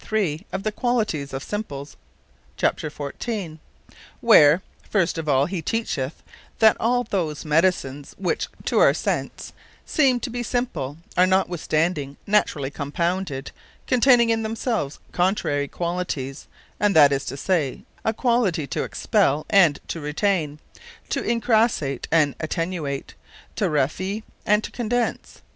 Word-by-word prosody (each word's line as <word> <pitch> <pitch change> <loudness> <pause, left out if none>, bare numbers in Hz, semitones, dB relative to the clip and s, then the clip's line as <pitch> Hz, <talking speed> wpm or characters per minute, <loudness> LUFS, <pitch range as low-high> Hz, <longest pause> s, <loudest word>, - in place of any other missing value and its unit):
3._ 195 -5 -1
of 190 0 -3
the 215 - 0
qualities 215 - -1
of 135 +1 -5
Simples, 145 -10 -5 0.6
c. 155 - 0
14. 160 +4 -5 0.6
Where, 150 +5 +6 0.3
first 175 -5 +1
of 155 -2 -3
all 135 0 +4
he 175 +1 -3
teacheth, 160 - -3 0.3
that 220 -1 +6
almost 245 0 0
all 180 -5 +2
those 150 0 -7
Medicines, 150 -3 0
which, 185 -3 -1 0.2
to - - +2
our - - +6
sence, - - -3 0.3
seeme 265 -5 +3
to 245 - -4
be 245 +1 -3
Simple, 195 - -2 0.2
are 180 +1 +5
notwithstanding 165 -5 0
naturally 155 -9 +1
Compounded, 155 0 -2 0.3
containing 245 -2 +5
in 225 0 +1
themselves 220 - -2
contrary 175 -6 0
qualities; 170 -6 -4 0.3
and 205 -1 +2
that 145 -3 +8
is 140 0 0
to 135 - -5
say, 155 -5 -1 0.2
a 220 - +2
quality 225 - +1
to 125 - -3
expell, 145 +3 +1
and 170 -8 +5
to 165 - -4
retaine; 150 0 0 0.5
to - - -1
incrassate, 225 - +1
and 155 -4 +4
attenuate; 160 -3 -3 0.4
to 210 - 0
rarifie, 185 +8 -1 0.2
and 210 +1 +4
to - - -6
condense. 240 0 -2
175 Hz, 135 wpm, -23 LUFS, 145-215 Hz, 0.6 s, that